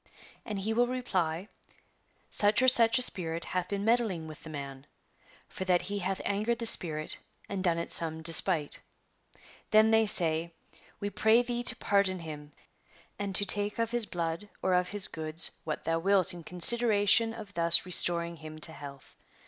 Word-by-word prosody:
And 210 -3 -5
he 210 +3 -3
will 240 +2 +1
reply: 190 -8 -4 0.4
" - - -43 0.3
Such 210 +5 +2
or - - +2
such 230 -2 +5
a 255 - +3
spirit 170 -7 -1
hath 180 -1 -4
been 200 0 -4
meddling 220 -8 -1
with 155 -1 -12
the 160 - -12
man,'' 140 -2 -9 0.6
for - - -8
that 180 -1 0
he 200 +3 -4
hath 190 0 -4
angered 215 +4 -2
the 230 - -6
spirit 155 -8 +2 0.3
and 195 -2 -6
done 170 -3 0
it 170 - -4
some 160 -1 0
despite." 165 -2 +1 0.9
Then 215 +1 +3
they 225 0 +2
say: 165 -3 -1 0.2
" - - -26
We 205 0 -4
pray 220 +4 +2
thee 240 0 -4
to 250 +1 +2
pardon 200 -5 -1
him, 150 -3 -10 0.7
and 200 -2 -5
to 205 - +3
take 205 +1 +1
of 230 -1 -3
his 240 -3 0
blood 170 +3 -5
or 185 - 0
of 180 0 0
his 205 -1 +1
goods 160 +1 0
what 155 -1 -6
thou 165 0 -2
wilt 190 0 +2
in 175 -1 -11
consideration 215 +4 +4
of 210 -3 -11
thus 170 -1 +6
restoring 170 -1 +3
him 155 0 -12
to 160 - -5
health." 140 -3 -13
185 Hz, 180 wpm, -28 LUFS, 165-215 Hz, 0.9 s, thus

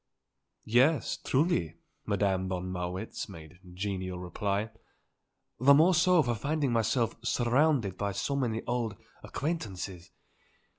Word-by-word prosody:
"Yes; 130 +7 +3
truly," 130 - 0 0.3
Madame 95 -2 0
von 90 0 -3
Marwitz 90 +5 -4
made 85 -1 -12
genial 95 -1 -4
reply. 100 +4 -2 0.9
"The 140 +3 +7
more 165 +6 +5
so 175 -1 +4
for 120 - 0
finding 140 +3 -1
myself 115 +1 +1
surrounded 120 - +2
by 100 -1 -1
so 140 +9 -2
many 115 -5 -1
old 120 -3 -1 0.3
acquaintances. 100 - -4
110 Hz, 110 wpm, -30 LUFS, 95-140 Hz, 0.9 s, The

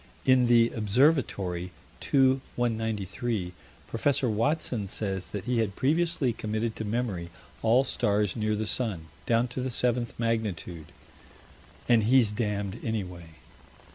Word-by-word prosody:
In 130 -1 +5
the 120 -1 +5
Observatory, 105 - +1 0.3
2 135 -1 +3
193, 110 -4 -2 0.3
Prof. 135 +4 +1
Watson 115 -1 0
says 95 -2 -3
that 105 - -5
he 120 0 0
had 105 -3 -1
previously 150 -3 +1
committed 110 +1 -3
to - - -3
memory 105 -6 -2 0.3
all 120 +4 +4
stars 105 -7 0
near 110 -1 0
the 110 +1 -2
sun, 100 -9 -1 0.2
down 115 +1 +3
to 125 +1 -4
the 130 - -2
seventh 120 -1 0
magnitude 105 -8 -2 1.0
And 120 -2 +5
he's 120 -2 +4
damned 105 -3 -2
anyway. 90 -7 -5
110 Hz, 125 wpm, -28 LUFS, 100-125 Hz, 1.0 s, In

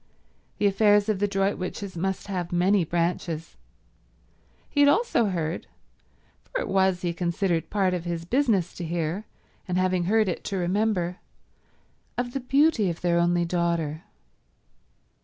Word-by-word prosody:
The 210 - 0
affairs 205 +1 +4
of 210 -3 +1
the 205 - +2
Droitwiches 195 -1 -2
must 190 +2 -2
have 180 -3 -4
many 180 +2 +3
branches. 165 -1 -2 1.1
He - - -3
had 285 0 +7
also 390 - +3
heard—for 175 - -6
it - - -3
was, 190 -2 +2
he 175 -1 0
considered, 170 0 -1
part 195 -3 +1
of 175 -2 -2
his 170 -1 -4
business 225 - +1
to 175 - -4
hear, 170 +4 -2 0.4
and 180 -1 -1
having 185 -1 +1
heard 210 -2 +1
to 195 - -3
remember—of 190 +5 -4
the 275 - -1
beauty 270 - +3
of 170 - -5
their 170 -1 +2
only 175 0 +2
daughter. 170 -3 -1
185 Hz, 135 wpm, -26 LUFS, 170-205 Hz, 1.1 s, had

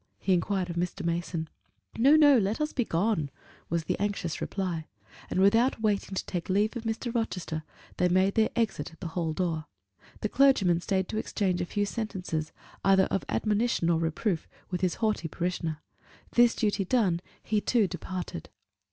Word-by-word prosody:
he 190 - +1
inquired 185 +1 0
of 170 -1 -5
Mr. 175 0 -2
Mason. 170 -1 -2 0.5
"No, 270 +6 +6
no; 295 -3 +7
let 205 +2 0
us 300 0 -1
be 250 - +1
gone," 170 -5 0 0.4
was 170 0 0
the - - -2
anxious 200 -6 -2
reply; 175 -5 -3 0.4
and - - -1
without 225 +6 +4
waiting 205 -3 0
to - - -2
take 175 -1 -4
leave 205 +5 +2
of 235 -1 -5
Mr. 225 +2 -2
Rochester, 180 -9 -2 0.4
they 180 - +3
made 185 +2 +3
their 220 -1 +3
exit 215 -11 -1
at 165 - -18
the 175 - -4
hall 165 -1 -1
door. 160 -2 -2 0.5
The 215 - 0
clergyman 205 -11 +4
stayed 190 0 0
to 215 - -3
exchange 190 -5 -1
a 175 - -2
few 205 +2 0
sentences, 185 -8 -3 0.3
either 195 -1 +5
of 195 - 0
admonition 210 -5 +1
or 165 - +2
reproof, 165 +2 -1 0.2
with 180 -1 -2
his 185 -2 +1
haughty 215 -6 0
parishioner: 165 -1 -3 0.5
this 240 -1 +5
duty 210 -3 +1
done, 190 -5 +2 0.2
he 215 -1 +1
too 230 -2 +3
departed. 180 0 -6
190 Hz, 175 wpm, -28 LUFS, 170-220 Hz, 0.5 s, no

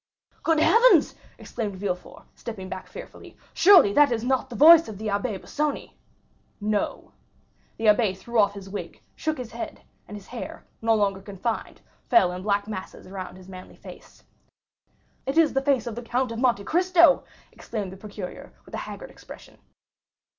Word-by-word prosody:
"Good 325 -1 +2
heavens!" 470 +9 +5 0.2
exclaimed 210 -4 -5
Villefort, 185 -2 -5
stepping 200 -6 -8
back 190 -1 -7
fearfully, - - -12 0.2
"surely 345 - +6
that 290 +1 +5
is 230 -1 -1
not 265 +1 0
the 240 - -8
voice 325 +4 +8
of 215 -3 -8
the 215 +1 -4
Abbé 200 +1 -1
Busoni!" 285 +11 -3 0.7
"No!" 210 0 -2 0.7
The 225 - -4
abbé 210 -3 +3
threw 235 +4 -2
off 200 -1 +3
his 195 -1 -9
wig, 200 +1 -7 0.2
shook 310 0 -2
his 245 -3 -7
head, 235 - -7 0.2
and 210 - -8
his 200 - -13
hair, 245 - -8 0.2
no 225 0 +3
longer 200 -2 0
confined, 200 +4 -5 0.3
fell 345 - +5
in 180 0 -6
black 200 +1 0
masses 200 -3 -7
around 185 -1 -8
his 185 0 -14
manly 185 -1 -11
face. - - -14 1.0
"It 270 +4 -2
is 325 -2 +4
the 270 - +1
face 270 -2 +1
of 235 - -4
the 240 - -6
Count 245 +1 -1
of 230 - -5
Monte 240 -6 +2
Cristo!" 345 - +4 0.3
exclaimed 205 -5 -6
the 190 - -10
procureur, 200 -2 -9
with - - -17
a - - -3
haggard - - -9
expression. - - -14
220 Hz, 170 wpm, -25 LUFS, 200-265 Hz, 1.0 s, voice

